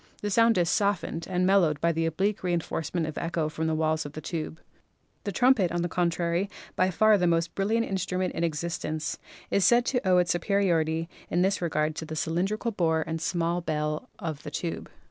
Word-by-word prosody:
The 205 Hz, -, -1 dB
sound 230 Hz, +1 st, +4 dB
is 175 Hz, -1 st, +3 dB
soft 200 Hz, 0 st, +1 dB
ened 165 Hz, -, -5 dB
and 180 Hz, 0 st, +1 dB
mellowed 180 Hz, -6 st, +3 dB
by 170 Hz, +3 st, +2 dB
the 165 Hz, 0 st, 0 dB
oblique 195 Hz, +6 st, 0 dB
reinforcement 170 Hz, -1 st, -1 dB
of 155 Hz, -, -4 dB
echo 165 Hz, -2 st, -1 dB
from 160 Hz, +1 st, -2 dB
the 160 Hz, -, +1 dB
walls 155 Hz, 0 st, +1 dB
of 145 Hz, -, -8 dB
the 155 Hz, -, -6 dB
tube. 160 Hz, 0 st, -5 dB, 0.7 s
The 200 Hz, -, -1 dB
trumpet, 245 Hz, -5 st, +3 dB
on 175 Hz, 0 st, -1 dB
the -, -, 0 dB
contrary, 175 Hz, +2 st, 0 dB, 0.3 s
by 185 Hz, -, +3 dB
far 215 Hz, +3 st, +4 dB
the 180 Hz, -, +2 dB
most 165 Hz, -1 st, +1 dB
brilliant 220 Hz, +4 st, +1 dB
instrument 185 Hz, -1 st, -2 dB
in 165 Hz, -, -2 dB
existence, 155 Hz, 0 st, -2 dB, 0.3 s
is 200 Hz, -, +3 dB
said 240 Hz, +3 st, +5 dB
to 250 Hz, -2 st, 0 dB
owe 180 Hz, -1 st, +5 dB
its 175 Hz, -2 st, +3 dB
superiority 170 Hz, -3 st, +1 dB, 0.2 s
in 175 Hz, +1 st, +2 dB
this 195 Hz, 0 st, +1 dB
regard 155 Hz, -2 st, 0 dB
to 160 Hz, -, -4 dB
the 155 Hz, -, -5 dB
cylindrical 190 Hz, +9 st, -1 dB
bore 160 Hz, -5 st, +1 dB
136 160 Hz, -1 st, -4 dB
PHYSICS -, -, 0 dB
and 175 Hz, -, -4 dB
small 170 Hz, +1 st, 0 dB
bell 150 Hz, +6 st, -2 dB
of 160 Hz, -6 st, -5 dB
the -, -, -7 dB
tube. 165 Hz, +3 st, -4 dB
170 Hz, 210 wpm, -27 LUFS, 160-190 Hz, 0.7 s, said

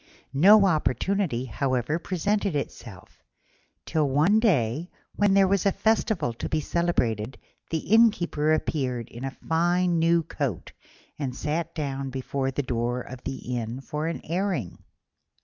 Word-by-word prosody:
No 200 Hz, +8 st, +7 dB
opportunity, 160 Hz, -, 0 dB
however, 130 Hz, +5 st, -1 dB
presented 195 Hz, +1 st, -1 dB
itself, 115 Hz, -8 st, -7 dB, 0.6 s
till 150 Hz, -3 st, +1 dB
one 160 Hz, +11 st, +4 dB
day, 160 Hz, -, +1 dB, 0.3 s
when 205 Hz, -1 st, +3 dB
there 195 Hz, -1 st, +5 dB
was 195 Hz, -1 st, +2 dB
a 200 Hz, -, +3 dB
festival 215 Hz, -, +1 dB
to 115 Hz, -, -5 dB
be 155 Hz, -, +1 dB
celebrated, 130 Hz, -9 st, -1 dB, 0.3 s
the 165 Hz, -, 0 dB, 0.2 s
Innkeeper 175 Hz, -9 st, +3 dB
appeared 130 Hz, -7 st, -1 dB
in 120 Hz, +2 st, -9 dB
a 135 Hz, 0 st, -5 dB
fine 175 Hz, +1 st, +2 dB
new 165 Hz, 0 st, +3 dB
coat 140 Hz, -, -4 dB, 0.5 s
and 130 Hz, -4 st, -3 dB
sat 160 Hz, +4 st, -3 dB
down 140 Hz, -3 st, -3 dB
before 135 Hz, +1 st, -2 dB
the 140 Hz, +2 st, -2 dB
door 120 Hz, 0 st, -1 dB
of 125 Hz, +1 st, -10 dB
the 125 Hz, -1 st, -4 dB
inn 115 Hz, +2 st, -5 dB
for 150 Hz, +3 st, -4 dB
an 170 Hz, -, -3 dB
airing. 180 Hz, -, -2 dB
150 Hz, 140 wpm, -26 LUFS, 130-180 Hz, 0.6 s, No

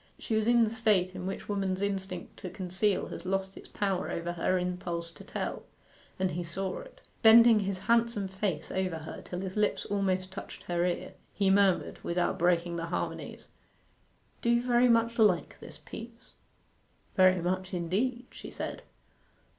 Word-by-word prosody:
She 225 Hz, -, -4 dB
was 220 Hz, 0 st, +1 dB
in 240 Hz, -1 st, +5 dB
the 220 Hz, -, +1 dB
state 210 Hz, -6 st, +2 dB
in 185 Hz, 0 st, -5 dB
which 195 Hz, -, -5 dB
woman's 195 Hz, -2 st, -1 dB
instinct 190 Hz, -3 st, -3 dB
to 185 Hz, -, -6 dB
conceal 190 Hz, +3 st, 0 dB
has 170 Hz, -, -7 dB
lost 190 Hz, +1 st, -2 dB
its -, -, -12 dB
power 195 Hz, -3 st, -1 dB
over 170 Hz, +1 st, -3 dB
her 175 Hz, +2 st, +1 dB
impulse 180 Hz, -2 st, -3 dB
to 150 Hz, -, -12 dB
tell; -, -, -4 dB, 0.6 s
and 185 Hz, -1 st, 0 dB
he 175 Hz, -, -3 dB
saw 185 Hz, +3 st, -3 dB
it. -, -, -13 dB, 0.2 s
Bending 230 Hz, 0 st, +8 dB
his 195 Hz, -1 st, -2 dB
handsome 230 Hz, -3 st, +2 dB
face 190 Hz, -4 st, -3 dB
over 185 Hz, -3 st, -1 dB
her 160 Hz, 0 st, -8 dB
till 180 Hz, 0 st, -6 dB
his 190 Hz, -1 st, -5 dB
lips 210 Hz, -1 st, +1 dB
almost 190 Hz, -2 st, 0 dB
touched 190 Hz, -, -9 dB
her 175 Hz, -1 st, 0 dB
ear, 175 Hz, -, -3 dB, 0.2 s
he 195 Hz, -2 st, +3 dB
murmured, 195 Hz, -2 st, +3 dB
without 175 Hz, +1 st, 0 dB
breaking 175 Hz, 0 st, +2 dB
the 165 Hz, 0 st, -3 dB
harmonies 175 Hz, -, -4 dB, 0.9 s
'Do 235 Hz, -, 0 dB
you 235 Hz, 0 st, +3 dB
very 245 Hz, 0 st, +4 dB
much 230 Hz, 0 st, +2 dB
like 200 Hz, -6 st, +3 dB
this -, -, -11 dB
piece?' 230 Hz, +1 st, -11 dB, 0.8 s
'Very 185 Hz, -1 st, +5 dB
much 185 Hz, +2 st, -2 dB
indeed,' 210 Hz, +9 st, -1 dB
she -, -, -9 dB
said. -, -, -5 dB
190 Hz, 170 wpm, -30 LUFS, 180-215 Hz, 0.9 s, Bending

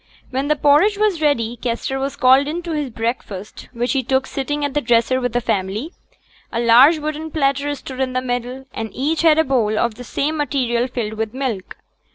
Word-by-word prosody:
When 265 Hz, +2 st, -1 dB
the 300 Hz, -, +3 dB
porridge 300 Hz, +9 st, +4 dB
was 415 Hz, -6 st, +1 dB
ready, 240 Hz, -6 st, +1 dB
Kester 250 Hz, +3 st, -3 dB
was 275 Hz, +1 st, -3 dB
called 265 Hz, +2 st, +5 dB
in 335 Hz, +4 st, -3 dB
to 340 Hz, -, -5 dB
his 295 Hz, -4 st, -2 dB
breakfast, 225 Hz, -4 st, -5 dB
which 240 Hz, 0 st, -1 dB
he 270 Hz, -, +1 dB
took 265 Hz, +1 st, 0 dB
sitting 290 Hz, +2 st, -2 dB
at 285 Hz, -, -3 dB
the 295 Hz, -, +1 dB
dresser 240 Hz, +2 st, +2 dB
with 245 Hz, -1 st, -1 dB
the 245 Hz, -, +2 dB
family. 215 Hz, -, -2 dB, 0.6 s
A 230 Hz, -, -2 dB
large 245 Hz, +7 st, +6 dB
wooden 310 Hz, +1 st, -4 dB
platter 285 Hz, -1 st, 0 dB
stood 265 Hz, -1 st, -9 dB
in 260 Hz, -1 st, -1 dB
the 255 Hz, -, +1 dB
middle; 245 Hz, +1 st, -3 dB
and 225 Hz, -, -4 dB
each 300 Hz, +5 st, 0 dB
had 320 Hz, -2 st, +5 dB
a 320 Hz, -, +5 dB
bowl 230 Hz, -7 st, +1 dB
of 235 Hz, 0 st, +1 dB
the 245 Hz, -, -10 dB
same 300 Hz, +5 st, -2 dB
material 255 Hz, -5 st, 0 dB
filled 235 Hz, -4 st, -4 dB
with 220 Hz, +2 st, -4 dB
milk. 250 Hz, -8 st, -3 dB
265 Hz, 210 wpm, -20 LUFS, 235-295 Hz, 0.6 s, large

